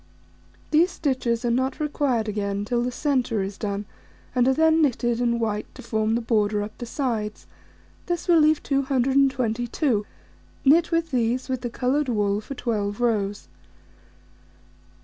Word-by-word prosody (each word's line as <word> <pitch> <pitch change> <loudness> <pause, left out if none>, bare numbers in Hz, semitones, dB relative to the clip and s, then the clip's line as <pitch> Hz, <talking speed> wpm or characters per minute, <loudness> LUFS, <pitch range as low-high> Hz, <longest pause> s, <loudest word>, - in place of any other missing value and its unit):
These 325 +4 +4
stitches 255 -8 -1
are 240 - +2
not 260 +3 0
required 280 -7 0
again 200 -1 -2
till 240 +2 0
the 250 +1 -1
centre 250 -6 0
is 195 +1 -5
done, 205 -1 -3 0.5
and 250 0 +3
are 265 - +4
then 320 +1 +4
knitted 240 -4 +1
in 235 -1 +1
white 215 -2 -2
to - - -10
form 220 -1 0
the 235 - 0
border 210 -2 +1
up 215 +1 -8
the 240 - -5
sides: 225 -5 -3 0.6
this 345 0 -2
will 340 -2 +6
leave 310 0 +3
222, 260 -3 +1 0.6
knit 325 +5 +5
with 330 -1 0
these, 250 +1 0
with 255 -1 -2
the 240 - -3
coloured 265 +4 0
wool 205 -2 +1
for 275 +6 -8
12 205 -4 -2
rows. 205 -4 0
240 Hz, 150 wpm, -24 LUFS, 215-275 Hz, 0.6 s, will